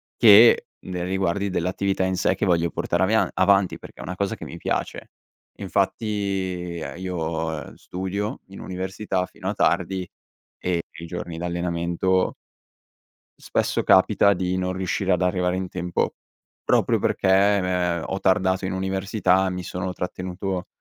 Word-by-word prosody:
che 110 Hz, +1 st, +7 dB, 0.2 s
nei 90 Hz, -1 st, -4 dB
riguardi 95 Hz, +1 st, 0 dB
dell'attività 95 Hz, +2 st, 0 dB
in 95 Hz, -, 0 dB
sé 95 Hz, -, +1 dB
che 100 Hz, -, -1 dB
voglio 85 Hz, -2 st, +2 dB
portare 95 Hz, -, -1 dB
avia 110 Hz, +3 st, +3 dB
avanti 100 Hz, -2 st, +3 dB
perché -, -, -14 dB
è -, -, -6 dB
una 90 Hz, -, -5 dB
cosa 100 Hz, +1 st, -1 dB
che -, -, -8 dB
mi -, -, -8 dB
piace. -, -, -3 dB, 0.5 s
Infatti -, -, 0 dB, 0.9 s
io 80 Hz, -3 st, -3 dB
studio 95 Hz, +3 st, -4 dB
in 95 Hz, 0 st, -11 dB
università 95 Hz, +1 st, -3 dB
fino 95 Hz, +1 st, -9 dB
a 100 Hz, -, 0 dB
tardi 95 Hz, +1 st, +1 dB, 0.5 s
e 90 Hz, -2 st, 0 dB, 0.2 s
i 85 Hz, -, -7 dB
giorni 85 Hz, -1 st, -6 dB
d'allenamento 85 Hz, +1 st, 0 dB, 1.1 s
spesso -, -, 0 dB
capita 100 Hz, -, +5 dB
di 90 Hz, -1 st, -1 dB
non 90 Hz, 0 st, -1 dB
riuscire 95 Hz, +1 st, -1 dB
ad 90 Hz, -, +2 dB
arrivare 90 Hz, 0 st, +1 dB
in 95 Hz, 0 st, -2 dB
tempo 90 Hz, -1 st, -2 dB, 0.5 s
proprio -, -, +2 dB
perché -, -, 0 dB, 0.3 s
m -, -, -2 dB
è 90 Hz, -2 st, 0 dB
ho 95 Hz, -, -3 dB
tardato 95 Hz, -1 st, +2 dB
in 95 Hz, -, -2 dB
università, 95 Hz, 0 st, +1 dB
mi 90 Hz, -1 st, -4 dB
sono 90 Hz, +2 st, -4 dB
trattenuto 90 Hz, 0 st, -4 dB
95 Hz, 145 wpm, -24 LUFS, 90-95 Hz, 1.1 s, che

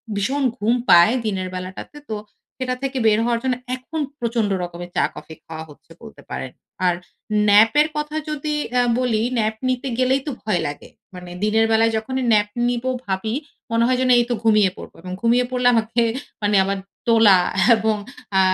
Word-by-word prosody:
ভীষণ 270 Hz, +8 st, -1 dB
ঘুম 225 Hz, +2 st, +1 dB, 0.2 s
পায় 175 Hz, +7 st, +7 dB
দিনের 190 Hz, -3 st, -2 dB
বেলাটাতে। 185 Hz, +10 st, -7 dB
তো 215 Hz, -, -2 dB, 0.4 s
সেটা 255 Hz, -1 st, -1 dB
থেকে 270 Hz, 0 st, -2 dB
বের 215 Hz, 0 st, +4 dB
হওয়ার 235 Hz, -1 st, +1 dB
জন্য 255 Hz, -1 st, +1 dB, 0.2 s
এখন 260 Hz, +5 st, -7 dB, 0.2 s
প্রচন্ড 230 Hz, -3 st, 0 dB
রকমের 175 Hz, 0 st, -7 dB
চা-কফি 160 Hz, -, -2 dB
খাওয়া 160 Hz, 0 st, -7 dB
হচ্ছে 150 Hz, +3 st, -18 dB
বলতে 225 Hz, -1 st, -12 dB
পারেন। 130 Hz, -, -5 dB, 0.3 s
আর 175 Hz, -, +3 dB, 0.5 s
nap 210 Hz, +2 st, +6 dB
এর 305 Hz, -, +2 dB
কথা 300 Hz, +1 st, -3 dB
যদি 300 Hz, 0 st, -3 dB, 0.2 s
অ্যা 250 Hz, 0 st, +2 dB, 0.2 s
বলি 230 Hz, -4 st, +1 dB, 0.2 s
nap 220 Hz, 0 st, 0 dB
নিতে 255 Hz, +1 st, -1 dB
গেলেই 260 Hz, +1 st, +2 dB
তো -, -, -1 dB
ভয় 185 Hz, -6 st, 0 dB
লাগে। 145 Hz, -, -8 dB, 0.3 s
মানে 180 Hz, -1 st, -9 dB
দিনের 220 Hz, +1 st, +3 dB
বেলায় 225 Hz, +1 st, +3 dB
যখনই 260 Hz, +4 st, -3 dB
nap 205 Hz, -1 st, +3 dB, 0.2 s
নিবো 245 Hz, +1 st, -1 dB, 0.2 s
ভাবি, 195 Hz, +3 st, -2 dB, 0.4 s
মনে 230 Hz, 0 st, +2 dB
হয় 255 Hz, -1 st, +2 dB
যেন 255 Hz, -, +1 dB
এই 240 Hz, -, +4 dB
তো -, -, +1 dB
ঘুমিয়ে 215 Hz, -3 st, +4 dB
পড়ব। -, -, -10 dB, 0.3 s
ঘুমিয়ে 240 Hz, +2 st, +3 dB
পড়লে 250 Hz, -1 st, +1 dB
আমাকে 225 Hz, +1 st, +1 dB, 0.6 s
আবার 195 Hz, +1 st, -1 dB, 0.3 s
তোলা 225 Hz, -5 st, +6 dB, 0.4 s
এবং 220 Hz, 0 st, 0 dB, 0.4 s
আ -, -, +6 dB
225 Hz, 170 wpm, -21 LUFS, 200-250 Hz, 0.6 s, পায়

